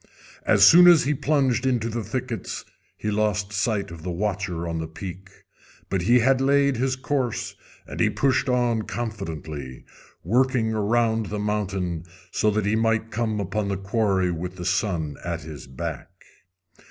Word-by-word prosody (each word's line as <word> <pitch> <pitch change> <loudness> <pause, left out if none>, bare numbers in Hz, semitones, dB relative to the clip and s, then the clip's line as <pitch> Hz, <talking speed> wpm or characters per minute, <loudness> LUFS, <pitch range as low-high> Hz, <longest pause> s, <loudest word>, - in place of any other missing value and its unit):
As - - +6
soon 175 +1 +9
as 175 -3 +7
he 150 - +1
plunged 135 -3 +1
into 125 -4 +1
the 115 0 -3
thickets 115 -1 -4 0.3
he 105 - -2
lost 105 -1 0
sight 100 -1 -1
of 85 -1 -9
the 90 - -5
watcher 90 -2 -2
on 85 -1 -3
the 80 - -3
peak; 95 +3 -8 0.6
but 95 -2 +1
he 120 +8 +4
had 130 +2 +3
laid 140 -1 +3
his 130 +1 0
course, 130 -3 -2 0.3
and - - -8
he - - +4
pushed 135 -1 +1
on 120 -3 +2
confidently, 80 - -6 0.4
working 120 +2 +2
around 110 +1 +1
the 105 - -4
mountain 95 -5 -2 0.3
so 110 - +2
that 105 -1 0
he 105 +2 +2
might 115 0 +1
come 110 -2 -1
upon 100 +1 -2
the 100 -1 -1
quarry 95 -2 +1
with 90 +2 -5
the 90 -1 -7
sun 85 -6 -1
at 85 -1 -3
his 75 -5 -9
back. 65 -1 -6
105 Hz, 165 wpm, -24 LUFS, 90-120 Hz, 0.6 s, soon